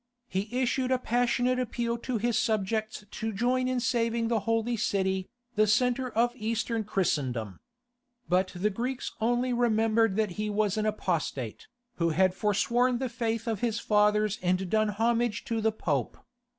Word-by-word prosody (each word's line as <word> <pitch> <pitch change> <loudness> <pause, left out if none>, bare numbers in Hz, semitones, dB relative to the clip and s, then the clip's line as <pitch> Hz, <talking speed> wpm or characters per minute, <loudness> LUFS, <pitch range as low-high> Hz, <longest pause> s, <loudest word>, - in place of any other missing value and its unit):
He 195 +3 -2
issued 255 0 0
a 260 - +3
passionate 245 +1 +1
appeal 235 -1 -1
to 250 0 -2
his 235 +1 0
subjects 215 0 -1
to 220 0 -3
join 250 +5 +1
in 255 -1 0
saving 230 -2 0
the 230 -2 +2
holy 225 +1 +1
city, 190 -3 0 0.2
the 215 -1 +3
centre 250 +4 +2
of 240 +2 +1
Eastern 225 0 -1
Christendom. 130 - -1 0.7
But 185 +1 +2
the 205 +4 0
Greeks 245 +5 -3
only 245 +2 +1
remembered 225 -3 +2
that 215 -2 +1
he 215 - -1
was 210 -1 +1
an 215 0 0
apostate, 215 - -2 0.3
who 170 0 +2
had 185 +3 +3
foresworn 235 +5 +1
the 260 0 -2
faith 230 -1 -2
of 220 -3 -1
his 230 -2 0
fathers 210 0 +2
and 185 0 0
done 215 -1 +3
homage 230 +1 0
to 225 -1 -1
the 220 0 +2
Pope. 220 - -2
225 Hz, 160 wpm, -28 LUFS, 210-240 Hz, 0.7 s, a